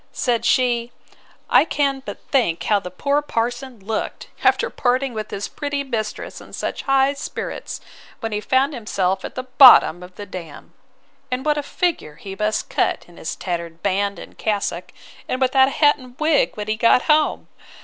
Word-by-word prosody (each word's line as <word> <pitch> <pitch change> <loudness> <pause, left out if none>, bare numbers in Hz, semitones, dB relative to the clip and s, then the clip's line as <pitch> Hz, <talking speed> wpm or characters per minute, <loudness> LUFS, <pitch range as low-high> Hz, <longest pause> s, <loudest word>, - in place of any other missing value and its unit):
Said 240 -3 0
she, 240 -2 +2 0.6
I - - +6
can 275 -3 0
but - - -7
think 230 - +2
how 210 -1 +2
the 180 - -7
poor 280 +10 0
parson 240 -2 -3
looked, 215 +3 -4
after 485 - +3
parting 255 +1 0
with 215 -1 -5
his 200 - -4
pretty 285 -1 -3
mistress 225 -5 -4
in - - -15
such - - -3
high 270 0 +3
spirits, 285 - -6 0.4
when 225 -1 -4
he 210 0 -2
found 265 +6 +2
himself 195 -6 -1
at - - -7
the 255 - -3
bottom 255 - +7
of 180 0 -12
the 205 - -7
dam! 170 -6 -10 0.6
And 255 +1 -3
what 300 -1 +2
a - - -1
figure 295 - -2
he 195 +4 -8
must 215 +1 -1
cut - - 0
in 175 - -18
his 160 - -5
tattered 170 -2 -5
band 200 0 0
and - - -11
cassock, 210 -2 -2 0.4
and 255 - -2
without 265 0 +4
a 275 - -4
hat 295 -1 +4
and 255 -1 -14
wig, 310 -1 +2
when 210 0 -4
he 215 0 -1
got 230 +2 +4
home. 305 0 +2
240 Hz, 180 wpm, -21 LUFS, 200-275 Hz, 0.6 s, bottom